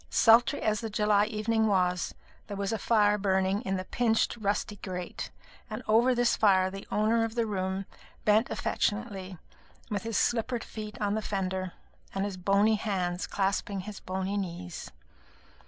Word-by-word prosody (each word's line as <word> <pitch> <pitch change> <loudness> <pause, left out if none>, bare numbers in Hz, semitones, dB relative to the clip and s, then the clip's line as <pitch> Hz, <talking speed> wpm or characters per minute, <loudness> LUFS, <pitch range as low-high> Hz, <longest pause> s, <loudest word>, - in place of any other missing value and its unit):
Sultry 235 +5 +5
as 215 -1 +1
the 225 - -3
July 210 -1 +3
evening 220 +1 +1
was, 180 -3 +1 0.3
there 205 - -5
was 200 +2 -1
a 220 - -1
fire 210 -2 +3
burning 190 0 +1
in 195 -5 -1
the 185 - -4
pinched 230 0 +1
rusty 205 -1 -1
grate, 180 -2 -5 0.4
and 215 +3 -5
over 235 +4 +4
this 240 -1 +3
fire 190 -3 +4
the 195 0 -8
owner 220 +2 +2
of 225 0 -3
the 235 -1 +1
room 190 -2 -2 0.4
bent 215 +4 +4
affectionately, 200 -4 -2 0.5
with 205 -2 -1
his 225 +1 -2
slippered 240 0 +1
feet 215 -1 -8
on 205 -2 0
the 220 - 0
fender, 190 -3 -2 0.4
and 195 +1 0
his 200 -2 -4
bony 200 +4 +3
hands 185 -4 -2
clasping 195 0 -1
his 205 +1 -8
bony 190 +2 -3
knees. 180 -3 -5
205 Hz, 160 wpm, -29 LUFS, 190-220 Hz, 0.5 s, Sultry